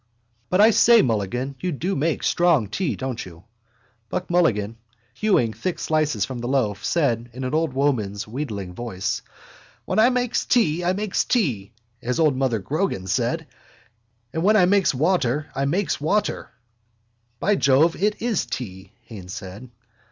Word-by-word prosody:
But, 185 +2 +3
I 220 +2 +7
say, 235 +1 +6
Mulligan, 120 +4 -1
you 180 - -2
do 180 +6 -2
make 155 +3 -1
strong 170 - +3
tea, 175 - -1
don't 130 -3 -4
you? 85 -1 -13 0.7
Buck 180 +7 -4
Mulligan, 115 -11 +1 0.4
hewing 125 - +1
thick 165 - -3
slices 155 -10 0
from 125 +1 -6
the 120 - -4
loaf, 115 -7 0
said 120 -8 0
in 130 +2 -6
an 130 - -3
old 160 -3 +1
woman's 115 -8 -1
wheedling 105 -7 -5
voice: 100 -3 -3 0.6
—When - - 0
I 230 +3 +6
makes 250 -2 0
tea 175 -8 +2
I 180 +1 +2
makes 205 0 -1
tea, 125 - -1 0.3
as 125 +4 -2
old 155 -4 +3
mother 130 -3 +1
Grogan 140 - -2
said. 95 - -1 0.9
And 160 - -1
when 210 +5 +4
I 180 - +6
makes 195 0 +3
water 150 -1 0
I 135 +1 -1
makes 175 +3 -1
water. 205 +8 0 0.9
—By 205 - +2
Jove, 140 +3 +3
it 210 +2 0
is 235 -6 0
tea, 95 -4 -7
Haines 100 -6 -9
said. 100 +7 -9
140 Hz, 160 wpm, -23 LUFS, 115-180 Hz, 0.9 s, I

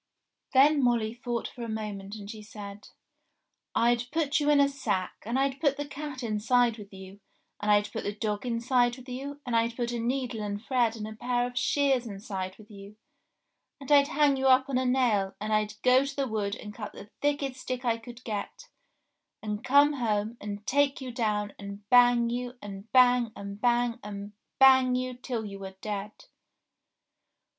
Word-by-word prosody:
Then 285 +1 +6
Molly 230 -3 +2
thought 240 -1 -3
for 245 - -11
a 230 - -5
moment 210 -2 -5
and 205 -2 -9
she 215 0 -8
said, 205 -1 -10 0.9
"I'd 240 +1 +2
put 310 -2 +1
you 295 0 +1
in 295 -1 +5
a 280 - +6
sack, 205 -10 -2
and 235 +3 0
I'd 270 0 0
put 280 -3 +2
the 290 - -3
cat 285 -2 -7
inside 230 +1 +2
with 205 -1 -11
you, 190 0 -11 0.4
and 210 - -2
I'd 205 0 +3
put - - -4
the 205 - 0
dog 210 0 -3
inside 240 0 +1
with 255 0 -13
you, 280 +3 -6
and 245 -2 -1
I'd 230 0 +1
put 240 -1 -2
a 240 - -3
needle 245 -1 -2
and 205 -1 -3
thread 240 -1 +1
and 215 -1 -5
a 220 - -7
pair 245 +2 0
of 245 0 -6
shears 270 -2 +2
inside 195 -2 -5
with 215 0 -16
you, 200 0 -11 0.8
and 275 0 -7
I'd 280 -1 +7
hang 290 -2 +3
you 265 0 +1
up 260 0 +5
on 255 -2 +1
a 260 - 0
nail, 230 -7 +2
and 215 +1 -2
I'd 215 0 0
go 255 +1 +5
to 275 0 -5
the 275 -1 -1
wood 210 -2 -2
and 210 -3 -9
cut 210 -1 -7
the 205 - -12
thickest 285 -2 -1
stick 255 -1 -4
I 230 -1 +1
could 240 +2 -12
get, 230 - -5 0.7
and 210 0 -4
come 285 +2 +5
home 220 -4 -1
and 205 0 -6
take 285 +1 +2
you 260 -2 -6
down 210 -3 -1
and 200 0 -9
bang 245 -1 +6
you, 245 +1 -4
and 200 0 -9
bang, 245 -2 +5
and 200 +1 -8
bang, 240 0 +2
and 205 0 -7 0.3
bang 260 -1 +6
you 255 0 -2
till 245 -2 -4
you 200 -1 -7
were 190 -1 -8
dead 210 0 -6
235 Hz, 195 wpm, -28 LUFS, 210-260 Hz, 0.9 s, I'd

